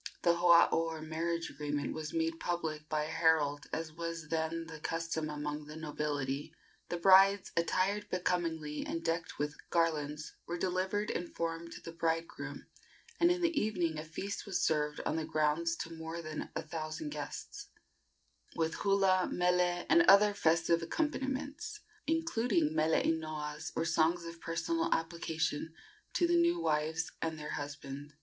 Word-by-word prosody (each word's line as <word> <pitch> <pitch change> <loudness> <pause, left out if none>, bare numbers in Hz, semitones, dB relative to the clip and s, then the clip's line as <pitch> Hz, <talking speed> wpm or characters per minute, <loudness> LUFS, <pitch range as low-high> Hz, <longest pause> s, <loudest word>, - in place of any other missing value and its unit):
The 170 - +5
hoao, 170 -1 +7
or 165 -1 0
marriage 165 +1 -2
agreement, 145 0 -2
was 155 -1 -5
made 165 0 -1
public 155 -3 -3
by 155 -1 +1
a 155 - -4
herald, 160 -3 +2
as 160 -1 -3
was 165 -1 -5
then 165 +1 -1
the 160 -1 -9
custom 165 -1 -2
among 150 0 -4
the 150 - -8
nobility; 145 -3 -3 0.3
the 175 - -1
brides, 195 +2 +6
attired 195 +5 +1
becomingly 165 -4 -1
and 165 - -4
decked 165 0 -1
with 145 0 -2
garlands, 155 -2 0
were 175 - -2
delivered 190 +3 0
in 175 - -2
form 165 0 -3
to - - -9
the 165 - -6
bride 165 0 0
groom, - - -7 0.5
and 340 - +6
in 355 0 +1
the 340 -1 +2
evening 175 -7 0
a - - -4
feast 195 +7 -5
was 185 -2 0
served 150 -1 +1
on 160 - 0
the 160 - -1
grounds 155 +1 +1
to 165 0 -6
more 160 +1 -5
than 155 -1 -5
a - - -2
thousand 155 - -4
guests, 410 +6 -6 0.9
with 160 0 0
hula, 195 -2 +3
mele, 180 0 +2
and 340 - +6
other 205 +1 +8
festive 165 -2 +3
accompaniments, 290 - -2 0.3
including 240 - +1
mele 160 0 +3
inoas, 155 -1 -2
or - - 0
songs 165 +1 +2
of 170 0 -8
personal 330 - -1
application 160 -1 -2 0.4
to 350 - +2
the 345 0 +4
new 340 0 +3
wives 155 - 0
and 160 -1 -2
their 150 0 -6
husband. 145 0 -6
165 Hz, 155 wpm, -33 LUFS, 155-180 Hz, 0.9 s, other